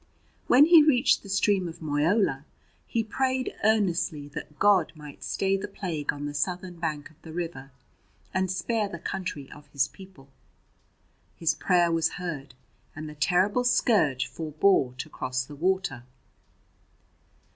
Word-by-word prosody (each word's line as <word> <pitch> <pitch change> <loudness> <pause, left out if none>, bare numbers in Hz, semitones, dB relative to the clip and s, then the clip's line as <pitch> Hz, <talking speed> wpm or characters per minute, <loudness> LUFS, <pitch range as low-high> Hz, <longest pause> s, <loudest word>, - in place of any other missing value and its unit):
When 270 +4 +7
he 335 0 +8
reached 285 -4 +4
the 200 - -12
stream 195 -1 +2
of 165 0 -9
Moyola 150 0 +1 0.4
he 230 - 0
prayed 260 +3 -1
earnestly 180 -8 +1
that 150 0 -8
God 200 -5 +4
might 150 -2 -11
stay 195 0 0
the 195 +1 -3
plague 175 -7 -3
on 145 0 -6
the 145 - -4
southern 175 +4 -3
bank 155 -3 -3
of 160 +1 -26
the 160 - -10
river, 165 -5 -5 0.6
and 190 0 0
spare 205 +4 -1
the 170 - -6
country 170 -5 -5
of 145 0 -13
his 140 -2 0
people. 185 -8 -15 1.1
His 165 - +1
prayer 175 -2 +2
was 165 -1 +1
heard, 160 -7 -6 0.4
and 155 0 -6
the 150 - -8
terrible 185 +9 +2
scourge 200 - +2
forbore 155 -4 +1
to - - -5
cross 130 0 -3
the 145 - -11
water. 180 -5 0
170 Hz, 145 wpm, -27 LUFS, 145-195 Hz, 1.1 s, he